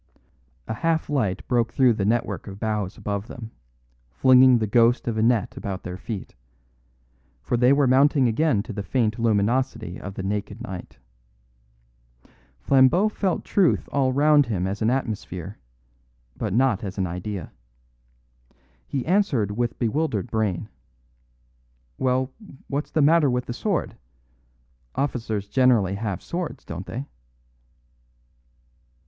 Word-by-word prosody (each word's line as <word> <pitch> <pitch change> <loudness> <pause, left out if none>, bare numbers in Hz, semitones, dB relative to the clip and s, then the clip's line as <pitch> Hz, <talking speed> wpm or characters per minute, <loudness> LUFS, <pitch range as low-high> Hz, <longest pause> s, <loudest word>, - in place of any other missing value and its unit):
A - - -2
half 160 +4 -1
light 110 -10 -1
broke 120 -2 +1
through 125 -2 +4
the 100 -3 -2
network 115 +1 -1
of 100 0 -8
boughs 105 -3 -2
above 100 +1 -4
them, 115 -2 -9 0.6
flinging 130 - +6
the 110 - 0
ghost 115 +4 +3
of 115 - -1
a 110 - 0
net 115 -1 +1
about 95 -1 -5
their 90 - -5
feet; 105 0 -7 1.1
for 120 - -1
they 125 +2 +4
were 140 0 +4
mounting 135 +1 +4
again 115 -3 +1
to 115 - -7
the 100 - -4
faint 110 +1 0
luminosity 115 -3 0
of 100 -1 -7
the 95 - -5
naked 100 +1 -3
night. 90 -6 -8 1.6
Flambeau 140 +10 +4
felt 195 -4 -2
truth 190 -5 +2
all 135 -2 +2
round 145 0 +4
him 95 -6 -1
as 100 +3 -3
an 110 - +2
atmosphere, 105 -7 -3 0.8
but - - -3
not 125 +2 +2
as 95 -1 -6
an 95 - 0
idea. 90 0 -5 1.4
He 135 -3 -3
answered 155 - +1
with 120 +3 -2
bewildered 120 -2 -1
brain: 105 -3 -1 1.3
"Well, 130 +1 +1 0.4
what's 145 +2 -3
the 155 - +2
matter 155 -1 +5
with 125 0 -1
the 120 - -4
sword? 195 - -2 1.0
Officers 115 -7 -2
generally 120 -6 +3
have 100 -2 -4
swords, 175 -1 -5
don't 85 +3 -7
they?" 130 +4 -5
115 Hz, 135 wpm, -24 LUFS, 100-135 Hz, 1.6 s, flinging